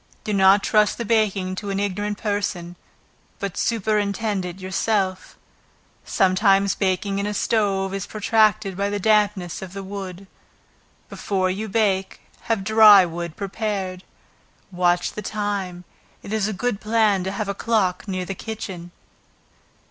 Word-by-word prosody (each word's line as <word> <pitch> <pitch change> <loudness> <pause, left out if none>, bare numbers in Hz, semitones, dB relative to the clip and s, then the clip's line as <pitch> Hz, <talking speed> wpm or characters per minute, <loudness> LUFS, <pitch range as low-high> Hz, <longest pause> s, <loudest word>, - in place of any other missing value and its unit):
Do 210 - -2
not 195 +1 +5
trust 210 -2 +2
the 235 - -4
baking 200 -4 +1
to 205 - -5
an 195 0 -1
ignorant 205 +1 -2
person, 200 -5 -3 0.6
but 200 -3 -4
superintend 210 -2 0
it 180 0 -6
yourself. 190 0 -1 0.7
Sometimes 195 0 +3
baking 195 +1 -1
in 200 - -1
a 210 - -3
stove, 195 -3 0
is 195 -1 -4
protracted 215 -2 +2
by 200 +2 -1
the 205 0 -2
dampness 205 -4 +1
of 190 -1 -8
the 195 0 -6
wood. 195 -1 -7 0.8
Before 185 -2 -1
you 215 +3 -4
bake, 195 -3 0 0.2
have 225 -4 0
dry 215 -2 +8
wood 170 -1 -6
prepared. 195 -2 -4 0.7
Watch 175 -1 +1
the 210 - -6
time; 200 -4 -3 0.4
it 205 - -6
is 215 -2 +1
a - - -2
good 215 +1 -2
plan 215 -3 +2
to 190 - -3
have 205 +1 -3
a 200 - -1
clock 200 -4 0
near 185 -2 -3
the 195 - -4
kitchen. 190 -4 -7
200 Hz, 145 wpm, -22 LUFS, 185-210 Hz, 0.8 s, dry